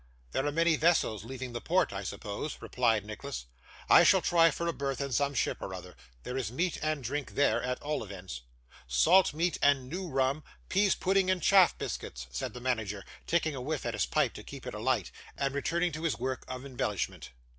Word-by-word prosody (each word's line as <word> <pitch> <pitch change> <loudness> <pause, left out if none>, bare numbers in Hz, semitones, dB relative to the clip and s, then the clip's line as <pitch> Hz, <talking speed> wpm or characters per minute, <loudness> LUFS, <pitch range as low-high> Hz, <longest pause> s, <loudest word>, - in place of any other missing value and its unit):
'There 135 - 0
are - - +1
many 165 +2 +3
vessels 155 - +2
leaving 130 +1 -6
the 120 - -4
port, 180 - +1
I 100 0 -4
suppose,' 100 +9 -5
replied 115 -4 +1
Nicholas. 110 - -6 0.4
'I - - +8
shall - - +6
try 165 -1 +5
for 170 +3 -3
a 170 - 0
berth 140 -2 -3
in 140 -1 -2
some 140 +3 +1
ship - - 0
or 95 - -5
other. 90 0 -10 0.3
There 125 - -5
is 130 -4 -2
meat 170 +7 -1
and 155 -3 -1
drink 140 +4 -4
there 145 - +3
at 125 0 -2
all 150 -3 -2
events.' 95 - -8 0.5
'Salt 170 - +5
meat 170 +2 0
and 140 -3 +3
new 180 +4 -4
rum; 135 0 0 0.3
pease 200 +1 +3
pudding 190 0 +2
and 185 -1 +2
chaff 190 +1 +5
biscuits,' - - -5
said - - -4
the - - -6
manager, 110 -5 -2 0.2
taking 165 -2 +1
a 130 - -5
whiff 150 +2 -3
at - - -1
his - - 0
pipe - - +1
to - - -9
keep - - -10
it - - -5
alight, - - 0 0.3
and 140 -1 0
returning 170 +5 0
to 155 +1 -6
his 165 -3 0
work 130 +1 -3
of 130 +1 -6
embellishment. 120 -7 -3
140 Hz, 210 wpm, -30 LUFS, 120-165 Hz, 0.5 s, I